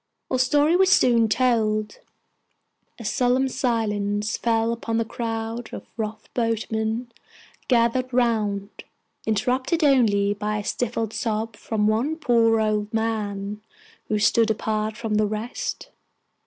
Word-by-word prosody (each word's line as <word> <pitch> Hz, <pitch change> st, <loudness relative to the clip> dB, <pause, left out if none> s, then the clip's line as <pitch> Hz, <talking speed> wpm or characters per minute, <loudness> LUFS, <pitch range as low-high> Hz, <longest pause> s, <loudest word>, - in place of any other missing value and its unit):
Our 255 Hz, -, +1 dB
story 295 Hz, +5 st, +3 dB
was 380 Hz, +1 st, +4 dB
soon 235 Hz, -8 st, +4 dB
told. 215 Hz, -3 st, +1 dB, 1.0 s
A 230 Hz, -, -9 dB
solemn 250 Hz, +4 st, +2 dB
silence 210 Hz, -4 st, -1 dB
fell 230 Hz, 0 st, +1 dB
upon 230 Hz, -1 st, -3 dB
the 230 Hz, -, +1 dB
crowd 225 Hz, 0 st, -4 dB
of -, -, -8 dB
rough 220 Hz, -1 st, -4 dB
boatmen 225 Hz, 0 st, -1 dB, 0.6 s
gathered 250 Hz, +1 st, +2 dB
round, 215 Hz, -5 st, 0 dB, 0.4 s
interrupted 255 Hz, -, 0 dB
only 210 Hz, -8 st, +4 dB
by 210 Hz, +1 st, -2 dB
a 210 Hz, -, -4 dB
stifled 225 Hz, -1 st, -2 dB
sob 220 Hz, -1 st, -2 dB
from 210 Hz, 0 st, -2 dB
one 230 Hz, +9 st, +1 dB
poor 230 Hz, -7 st, +3 dB
old 215 Hz, -1 st, 0 dB
man, 210 Hz, -2 st, -2 dB, 0.5 s
who 215 Hz, -, 0 dB
stood 220 Hz, +2 st, +3 dB
apart 215 Hz, 0 st, -1 dB
from 225 Hz, -2 st, -1 dB
the 215 Hz, 0 st, +2 dB
rest. 230 Hz, -, -4 dB
225 Hz, 125 wpm, -24 LUFS, 215-240 Hz, 1.0 s, was